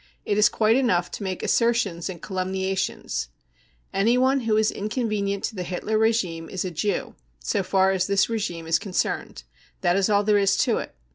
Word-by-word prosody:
It 205 Hz, -, 0 dB
is 210 Hz, 0 st, +5 dB
quite 220 Hz, +1 st, +2 dB
enough 185 Hz, -10 st, +1 dB
to -, -, -6 dB
majke 185 Hz, -2 st, -4 dB
assertions 230 Hz, -8 st, +1 dB
and 175 Hz, -3 st, -8 dB
calumniations. 190 Hz, -, -2 dB, 0.7 s
Anyone 250 Hz, +7 st, +3 dB
who 225 Hz, -3 st, +1 dB
is 220 Hz, 0 st, +3 dB
inconvenient 210 Hz, -2 st, -2 dB
to 220 Hz, -, -3 dB
the 185 Hz, -, -4 dB
Hitler 180 Hz, +4 st, -3 dB
regime 205 Hz, -7 st, +1 dB
is 190 Hz, -1 st, -3 dB
a 185 Hz, -, -3 dB
"Jew" 175 Hz, +4 st, -2 dB, 0.2 s
so -, -, -1 dB
far 190 Hz, 0 st, +2 dB
as 190 Hz, -1 st, 0 dB
this 200 Hz, -1 st, +3 dB
regime 200 Hz, -8 st, -3 dB
is 165 Hz, 0 st, +2 dB
concerned. 180 Hz, -, -3 dB, 0.4 s
That 175 Hz, 0 st, +2 dB
is 195 Hz, +1 st, +2 dB
all 205 Hz, -1 st, +3 dB
there 205 Hz, 0 st, +3 dB
is 195 Hz, -1 st, +2 dB
to -, -, +2 dB
it. -, -, -8 dB
195 Hz, 185 wpm, -24 LUFS, 180-215 Hz, 0.7 s, is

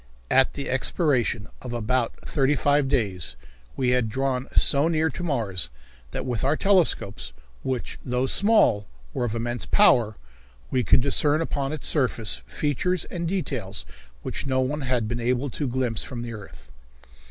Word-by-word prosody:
At 135 Hz, 0 st, +4 dB
the 140 Hz, -, -4 dB
expiration 130 Hz, -, +2 dB
of 125 Hz, -2 st, -6 dB
about 120 Hz, +1 st, 0 dB
thirty 140 Hz, 0 st, +1 dB
five 145 Hz, +1 st, +2 dB
days 100 Hz, -, -1 dB, 0.4 s
we 130 Hz, -2 st, +1 dB
had 125 Hz, -3 st, +2 dB
drawn 130 Hz, +2 st, -1 dB
so 140 Hz, +3 st, +4 dB
near 160 Hz, -1 st, +1 dB
to 130 Hz, -, -7 dB
Mars 105 Hz, -, +1 dB, 0.4 s
that -, -, -5 dB
with 120 Hz, -4 st, -2 dB
our 140 Hz, +4 st, +2 dB
telescopes, 175 Hz, -, +1 dB, 0.3 s
which, 130 Hz, -3 st, -4 dB
though 125 Hz, +1 st, 0 dB
small, 165 Hz, -, +3 dB, 0.3 s
were 120 Hz, -, -1 dB
of 115 Hz, -1 st, -3 dB
immense 120 Hz, +1 st, -2 dB
power, 120 Hz, -, +4 dB, 0.6 s
we 125 Hz, -, +1 dB
could 125 Hz, -, +4 dB
discern 145 Hz, +3 st, +2 dB
upon 140 Hz, -4 st, -2 dB
its 155 Hz, -, -4 dB
surface 115 Hz, -, +2 dB
features 160 Hz, +5 st, -1 dB
and 170 Hz, -2 st, -3 dB
details 130 Hz, -, -3 dB, 0.4 s
which -, -, -5 dB
no 130 Hz, -1 st, +1 dB
one 145 Hz, +4 st, -1 dB
had 125 Hz, -4 st, 0 dB
been 120 Hz, +2 st, -3 dB
able 125 Hz, +3 st, 0 dB
to 145 Hz, +5 st, -3 dB
glimpse 125 Hz, -3 st, -1 dB
from 120 Hz, -2 st, -5 dB
the 120 Hz, -1 st, -6 dB
earth. 105 Hz, -3 st, -12 dB
130 Hz, 160 wpm, -25 LUFS, 115-145 Hz, 0.6 s, At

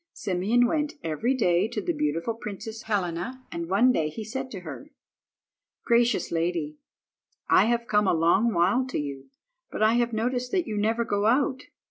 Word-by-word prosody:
Simeon 205 Hz, +6 st, +1 dB
went 300 Hz, +3 st, 0 dB
every 165 Hz, -, 0 dB
day 180 Hz, -5 st, +2 dB
to 225 Hz, -1 st, -4 dB
the 175 Hz, -4 st, -1 dB
beautiful 150 Hz, +8 st, -1 dB
Princess 220 Hz, 0 st, -7 dB
Helena, 205 Hz, +5 st, -3 dB
and 170 Hz, 0 st, -5 dB
one 225 Hz, +7 st, +4 dB
day 155 Hz, -10 st, 0 dB
he 215 Hz, +9 st, -7 dB
said 260 Hz, +5 st, -5 dB
to 195 Hz, -7 st, -7 dB
her— 180 Hz, -, -9 dB, 1.0 s
"Gracious 235 Hz, 0 st, +2 dB
lady, 165 Hz, -3 st, -2 dB, 0.7 s
I 195 Hz, -, +6 dB
have 235 Hz, 0 st, 0 dB
come 210 Hz, -2 st, +2 dB
a -, -, +3 dB
long 175 Hz, +8 st, +3 dB
while 190 Hz, +7 st, +2 dB
to 255 Hz, -, -3 dB
you, 140 Hz, -2 st, -5 dB, 0.4 s
but -, -, -2 dB
I 220 Hz, +1 st, +5 dB
have 240 Hz, 0 st, -1 dB
noticed 245 Hz, +3 st, -1 dB
that 365 Hz, -3 st, +1 dB
you 220 Hz, -, -4 dB
never 225 Hz, +3 st, +1 dB
go 205 Hz, -1 st, 0 dB
out. 260 Hz, +2 st, +2 dB
215 Hz, 175 wpm, -26 LUFS, 175-240 Hz, 1.0 s, I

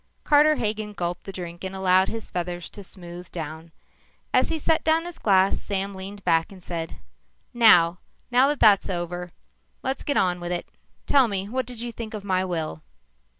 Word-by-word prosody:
Carter 305 Hz, +1 st, +5 dB
Hagen 215 Hz, -3 st, -2 dB
gulped 175 Hz, -2 st, -4 dB
the 195 Hz, -, -5 dB
drink 175 Hz, -2 st, -7 dB
and 190 Hz, 0 st, -5 dB
allowed 190 Hz, 0 st, +4 dB
his 225 Hz, -1 st, -6 dB
feathers 175 Hz, -1 st, -4 dB
to 205 Hz, -, -8 dB
smooth 175 Hz, -1 st, -9 dB
down. 160 Hz, 0 st, -7 dB, 0.6 s
As -, -, +4 dB
he 325 Hz, -, -1 dB
set 320 Hz, +1 st, +1 dB
down 320 Hz, +1 st, +2 dB
his 350 Hz, -1 st, -8 dB
glass, 195 Hz, -2 st, +3 dB
Sam 200 Hz, 0 st, -2 dB
leaned 195 Hz, +1 st, -8 dB
back 165 Hz, +2 st, +2 dB
and 185 Hz, -2 st, -13 dB
said, 165 Hz, -2 st, -5 dB, 0.6 s
"Now 180 Hz, -7 st, +6 dB, 0.3 s
that 270 Hz, +4 st, +4 dB
that's 205 Hz, -3 st, +5 dB
over, 175 Hz, 0 st, -4 dB, 0.5 s
let's 265 Hz, +1 st, -2 dB
get 285 Hz, -, 0 dB
on 180 Hz, -1 st, +2 dB
with 175 Hz, 0 st, -4 dB
it. 175 Hz, -, -3 dB, 0.4 s
Tell 270 Hz, -3 st, +5 dB
me 195 Hz, -2 st, -3 dB
what 255 Hz, +1 st, -2 dB
did 245 Hz, -2 st, -6 dB
you 240 Hz, 0 st, -4 dB
think 225 Hz, -1 st, -7 dB
of 205 Hz, -, -6 dB
my 185 Hz, -2 st, +1 dB
will?" 160 Hz, -, -3 dB
190 Hz, 185 wpm, -25 LUFS, 175-225 Hz, 0.6 s, Now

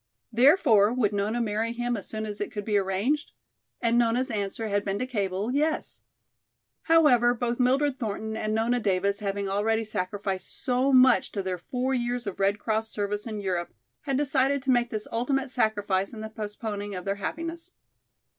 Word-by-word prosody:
Therefore 240 Hz, -, +5 dB
would 230 Hz, -5 st, +1 dB
Nona 205 Hz, +4 st, 0 dB
marry 225 Hz, 0 st, -1 dB
him 240 Hz, 0 st, -1 dB
as 200 Hz, -, -6 dB
soon 215 Hz, 0 st, -4 dB
as 210 Hz, -1 st, -6 dB
it 205 Hz, -, -3 dB
could 205 Hz, -1 st, -5 dB
be 215 Hz, -, 0 dB
arranged? 200 Hz, +10 st, 0 dB, 0.5 s
And 235 Hz, 0 st, +3 dB
Nona's 240 Hz, +3 st, +1 dB
answer 210 Hz, +1 st, -3 dB
had 205 Hz, -1 st, 0 dB
been 200 Hz, 0 st, -2 dB
to 255 Hz, -, -2 dB
cable, 205 Hz, -3 st, -2 dB
"Yes."[B] 305 Hz, +3 st, -1 dB, 0.9 s
However, 245 Hz, -7 st, +5 dB
both 240 Hz, +1 st, -2 dB
Mildred 265 Hz, +2 st, +2 dB
Thornton 220 Hz, -1 st, -3 dB
and 215 Hz, 0 st, -1 dB
Nona 235 Hz, +2 st, +1 dB
Davis 200 Hz, -1 st, 0 dB
having 200 Hz, -1 st, -2 dB
already 220 Hz, +3 st, 0 dB
sacrificed 195 Hz, -2 st, -4 dB
so 255 Hz, +1 st, +1 dB
much 255 Hz, -1 st, +5 dB
to 200 Hz, -, -2 dB
their 185 Hz, -1 st, -3 dB
four 250 Hz, +8 st, -2 dB
years 245 Hz, -1 st, -1 dB
of 200 Hz, -2 st, -5 dB
Red 200 Hz, +1 st, +2 dB
Cross 220 Hz, +1 st, -1 dB
service 205 Hz, +1 st, -3 dB
in 215 Hz, -2 st, -4 dB
Europe, 175 Hz, -8 st, -3 dB, 0.3 s
had 275 Hz, -3 st, -1 dB
decided 275 Hz, -1 st, +1 dB
to 265 Hz, -, +2 dB
make 240 Hz, -1 st, +2 dB
this 215 Hz, -2 st, -4 dB
ultimate 260 Hz, +3 st, -1 dB
sacrifice 205 Hz, -4 st, 0 dB
in 220 Hz, -, -7 dB
the 220 Hz, -, -5 dB
postponing 205 Hz, -1 st, -5 dB
of 180 Hz, -, -6 dB
their 200 Hz, 0 st, -1 dB
happiness. 330 Hz, +4 st, -5 dB
220 Hz, 180 wpm, -27 LUFS, 205-250 Hz, 0.9 s, Therefore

